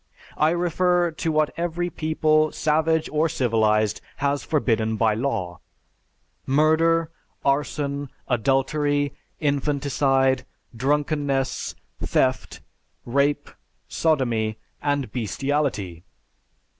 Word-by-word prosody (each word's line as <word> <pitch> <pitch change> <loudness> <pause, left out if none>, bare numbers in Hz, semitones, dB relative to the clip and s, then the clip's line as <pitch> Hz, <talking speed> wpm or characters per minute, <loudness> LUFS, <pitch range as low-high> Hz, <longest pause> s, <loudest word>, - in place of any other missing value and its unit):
I 155 - +4
refer 175 0 +1
to 160 +1 -2
what 155 -1 +1
every 175 +1 -2
people, 155 -1 +2
savage 160 +1 +1
or 155 +2 +2
civilized, 110 -6 +1 0.2
has 140 0 0
forbidden 110 -7 0
by 110 0 +3
law: 105 -7 -2 0.9
murder, 160 +3 +3 0.3
arson, 140 0 -1 0.2
adultery, 140 +3 +1 0.3
infanticide, 140 -2 +1 0.3
drunkenness, 140 0 -1 0.3
theft, 130 0 0 0.4
rape, 140 +3 +1 0.4
sodomy, 120 -9 0 0.2
and 145 -2 -1
bestiality. 120 - -2
145 Hz, 80 wpm, -24 LUFS, 130-155 Hz, 0.9 s, I